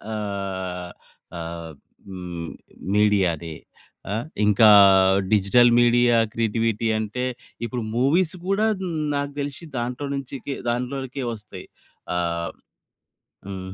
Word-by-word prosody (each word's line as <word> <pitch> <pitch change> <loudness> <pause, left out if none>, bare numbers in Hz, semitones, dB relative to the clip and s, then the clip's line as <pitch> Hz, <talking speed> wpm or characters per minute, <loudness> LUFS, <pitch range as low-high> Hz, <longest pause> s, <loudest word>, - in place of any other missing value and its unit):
ఆహ్, 95 -3 -4 0.5
ఆహ్, 85 -1 -6 0.4
హ్మ్ 90 -3 -6 0.5
మీడియాదే. 90 -6 +2 0.6
ఆ! - - 0 0.3
ఇంకా 105 +2 +5 0.7
డిజిటల్ 120 +4 +5
మీడియా 120 0 +4 0.2
క్రియేటివిటీ 115 0 0
అంటే 110 +4 -3 0.4
ఇప్పుడు 120 -1 -4
మూవీస్ 160 +7 +2
కూడా 195 +2 +2 0.5
నాకు 140 0 -2
దెలిషి 140 +3 -6
దాంట్లో 125 +4 -3
నుంచికె 135 0 -5
దాంట్లోనికే 130 +2 -3
వస్తాయి. 105 -4 -10 0.5
ఆహ్, 85 -1 -2 1.0
హ్మ్. 95 -1 -6
110 Hz, 90 wpm, -23 LUFS, 95-125 Hz, 1.0 s, ఇంకా